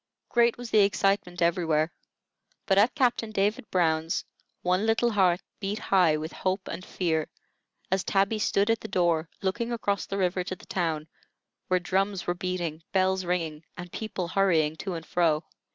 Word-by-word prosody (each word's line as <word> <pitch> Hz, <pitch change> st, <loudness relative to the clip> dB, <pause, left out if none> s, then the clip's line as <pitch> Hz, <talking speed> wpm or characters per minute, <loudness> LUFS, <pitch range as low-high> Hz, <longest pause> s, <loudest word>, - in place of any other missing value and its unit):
Great 235 Hz, -1 st, +3 dB
was 245 Hz, -1 st, -7 dB
the 215 Hz, -, +5 dB
excitement 195 Hz, -3 st, +2 dB
everywhere; 165 Hz, -2 st, +2 dB, 0.7 s
but 195 Hz, -1 st, +4 dB
at 230 Hz, +5 st, +4 dB
Captain 245 Hz, -5 st, +1 dB
David 215 Hz, +4 st, 0 dB
Brown's 160 Hz, -2 st, +1 dB, 0.4 s
one 185 Hz, +4 st, +1 dB
little 225 Hz, +2 st, +2 dB
heart 185 Hz, -4 st, +3 dB, 0.2 s
beat 200 Hz, +1 st, -2 dB
high 180 Hz, -7 st, +3 dB
with 155 Hz, +2 st, -5 dB
hope 185 Hz, +1 st, -2 dB
and 175 Hz, +2 st, -5 dB
fear, 160 Hz, -5 st, -1 dB, 0.6 s
as 190 Hz, 0 st, +2 dB
Tabby 200 Hz, +2 st, +1 dB
stood 205 Hz, +1 st, +2 dB
at 225 Hz, -, +1 dB
the -, -, -6 dB
door, 170 Hz, -4 st, +1 dB
looking 230 Hz, +5 st, -1 dB
across 200 Hz, -4 st, -1 dB
the 195 Hz, -, -3 dB
river 180 Hz, -1 st, +1 dB
to 185 Hz, -, -5 dB
the -, -, -16 dB
town, 160 Hz, -4 st, -2 dB, 0.6 s
where 185 Hz, 0 st, +2 dB
drums 190 Hz, +2 st, 0 dB
were 175 Hz, -, +1 dB
beating, 175 Hz, -3 st, -3 dB
bells 190 Hz, -1 st, +2 dB
ringing, 165 Hz, -3 st, -2 dB
and 175 Hz, -1 st, -8 dB
people 195 Hz, -5 st, -4 dB
hurrying 165 Hz, -6 st, +2 dB
to 190 Hz, 0 st, -4 dB
and 165 Hz, -1 st, -6 dB
fro. 165 Hz, -2 st, +2 dB
185 Hz, 170 wpm, -27 LUFS, 170-200 Hz, 0.7 s, the